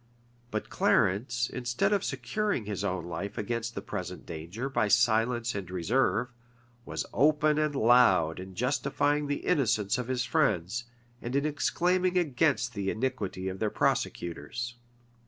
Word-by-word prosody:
But 110 -2 -4
Clarence, 120 +5 +2
instead 120 - 0
of 200 -1 +1
securing 210 - -1
his 100 -2 -3
own 90 -4 -2
life 100 +3 -5
against 115 +2 -3
the - - -5
present - - -6
danger 85 +10 -5
by 135 -5 +1
silence 120 +1 +2
and 100 -3 -5
reserve, 115 +6 0 0.5
was - - -3
open 150 +2 +3
and 150 -1 0
loud 110 -10 +4
in 95 0 -9
justifying 145 +4 0
the 145 - -3
innocence 120 - +2
of 125 - -3
his 125 -1 -1
friends, 115 0 +1 0.4
and 120 +3 -4
in 140 +1 +2
exclaiming 180 +4 +1
against 145 -5 +1
the 100 -3 -2
iniquity 110 -6 -2
of 95 0 -4
their 110 - +1
prosecutors. 85 +8 -2
120 Hz, 140 wpm, -29 LUFS, 100-140 Hz, 0.5 s, loud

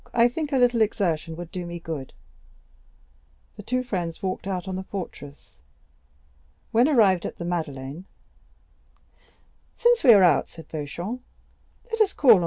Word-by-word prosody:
I 235 0 +6
think 300 +4 -4
a 270 - +2
little 245 -2 +3
exertion 165 -7 0
would 175 0 -8
do 180 - -4
me 170 0 -5
good." 155 -5 -6 1.4
The - - -9
two 255 +1 -1
friends 180 -9 -4
walked 190 0 -3
out 190 -1 -3
on 190 - -3
the 190 - -3
fortress. 165 -7 -8 1.1
When 235 +2 +4
they - - +1
arrived 195 - +4
at - - -5
the 170 - -5
Madeleine: 155 -2 -4 1.7
"Since 480 0 +3
we 245 -5 +9
are 200 -3 +6
out," 170 -5 +4
said 165 - -13
Beauchamp, 170 - -5 0.7
"let 455 0 0
us 405 -2 +3
call 265 -5 +6
on 220 - +9
M. - - +1
185 Hz, 165 wpm, -25 LUFS, 165-240 Hz, 1.7 s, we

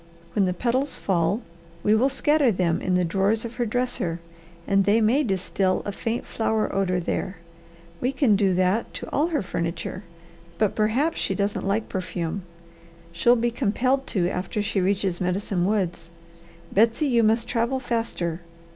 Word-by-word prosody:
When 200 0 +3
the 180 - 0
petals 255 +7 0
fall 190 +4 0 0.4
we 210 - +4
will 245 +5 +4
scatter 290 -1 +3
them 175 -4 0
in 185 - +1
the 180 -1 +2
drawers 200 +6 +1
of 235 +1 -7
her 240 -2 0
dresser, 210 -8 -1 0.5
and 195 0 +3
they 205 +3 +4
may 230 +6 +3
distil 190 -3 0
a 205 - -2
faint 225 +4 -3
flower 220 -1 -1
odour 185 -2 +1
there. 185 +2 -3 0.6
We 250 - 0
could 260 -7 +3
do 195 -2 +2
that 185 +5 +1
to - - -6
all 300 +3 +2
her 315 -9 -1
furniture, 170 +2 -4 0.5
but 215 -2 +2
perhaps 240 +10 +1
she 195 - -1
doesn't 200 0 -1
like 210 +3 0
perfume. 180 -1 -3 0.7
She'll 175 +9 +4
be 240 0 0
compelled 255 +3 0
to 180 -4 +1
after 185 +3 -2
she 200 -1 0
reaches 190 -1 0
Medicine 180 0 0
Woods. 185 -5 -1 0.6
Betsy, 230 +8 +3
you 240 -4 +3
must 225 +1 +2
travel 240 +2 0
faster!" 225 -9 -2
205 Hz, 165 wpm, -25 LUFS, 185-235 Hz, 0.7 s, we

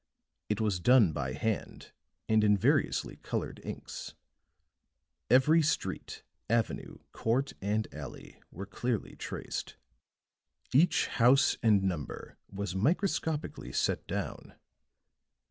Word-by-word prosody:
It 105 - 0
was 105 -5 +1
done 115 -4 +5
by 65 -3 -3
hand 110 -2 -3 0.4
and 110 -1 +4
in 105 -1 +5
variously - - +1
colored - - -4
inks; - - -7 1.1
every 150 +6 +6
street, 155 +1 -2 0.3
avenue, 115 -1 -1
court 130 +5 0
and 105 +2 0
alley 75 -3 -9
were 95 +4 -7
clearly 110 +3 -3
traced; - - -5 1.0
each 155 +7 +4
house 130 +3 +4
and 105 -4 +4
number 85 -7 -4
was 100 -2 -4
microscopically 150 - -1
set - - 0
down. - - -5
110 Hz, 105 wpm, -31 LUFS, 95-130 Hz, 1.1 s, every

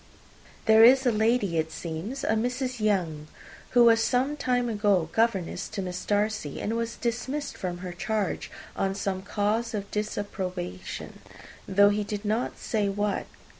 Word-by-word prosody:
There 220 0 +7
is 260 +3 +7
a 245 - +4
lady, 215 -5 +2
it 160 0 -2
seems, 180 - -5
a - - -1
Mrs. 250 +3 -1
Younge, 175 -8 0 0.5
who 240 - +9
was 225 -1 +6
some 260 +5 +1
time 250 -4 0
ago 205 -7 +2
governess 220 -6 0
to 215 -3 -4
Miss 180 0 -5
Darcy, 210 -7 -1
and 225 - -2
was 230 0 -2
dismissed 260 +5 -3
from 180 -2 -4
her 180 - -5
charge 210 +3 -2 0.3
on 195 0 0
some 195 -2 -2
cause 215 +3 -1
of 200 -1 -5
disapprobation, 185 - -4 0.5
though 200 +1 +5
he 210 +1 0
did 205 0 -5
not 220 +4 -1
say 210 -3 -1
what. 205 +1 -1
210 Hz, 155 wpm, -27 LUFS, 190-230 Hz, 0.5 s, who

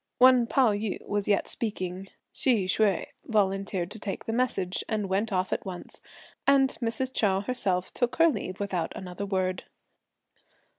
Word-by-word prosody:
While 250 -2 +6
Pao 255 -3 +4
yü 205 0 -3
was 205 -1 -1
yet 205 -1 +2
speaking, 190 -4 -4 0.3
Hsi 230 -8 +2
Hsüeh 195 0 +2 0.2
volunteered 195 -3 0
to 220 - -6
take 200 -2 -4
the 225 - -2
message, 210 -7 0
and 215 -3 -1
went 200 +4 0
off 185 -1 0
at - - -2
once; 185 -2 -6 0.5
and 275 -1 +5
Mrs. 240 +3 -1
Chou 195 -5 +2
herself 200 -6 -1
took 245 0 0
her 330 +3 +6
leave 185 - -2
without 190 -5 -2
another 185 +2 -5
word. 185 -1 -1
205 Hz, 155 wpm, -28 LUFS, 190-235 Hz, 0.5 s, While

